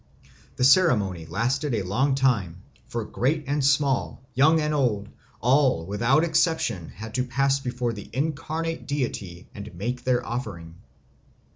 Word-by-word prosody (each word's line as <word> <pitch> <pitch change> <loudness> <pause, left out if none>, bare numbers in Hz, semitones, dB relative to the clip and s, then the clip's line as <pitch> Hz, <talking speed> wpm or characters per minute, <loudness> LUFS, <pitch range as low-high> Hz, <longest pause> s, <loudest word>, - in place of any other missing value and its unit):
The - - -1
ceremony 105 - +3
lasted 125 - -1
a 105 - -1
long 130 +9 +1
time, 105 -10 0 0.2
for 115 -2 -4
great 145 +8 -1
and 145 +1 -1
small, 140 -3 +1
young 155 +6 +4
and 150 0 0
old, 110 -8 0 0.3
all 125 - +3
without 115 - +2
exception 160 - 0
had 110 +1 -9
to 125 +1 0
pass 135 +2 +1
before 125 -2 -2
the 105 -2 -9
incarnate 160 +4 -3
deity 105 -11 -4
and 100 +1 -8
make 120 +7 -4
their 125 -1 +1
offering. 85 -9 -5
125 Hz, 140 wpm, -25 LUFS, 105-140 Hz, 0.3 s, young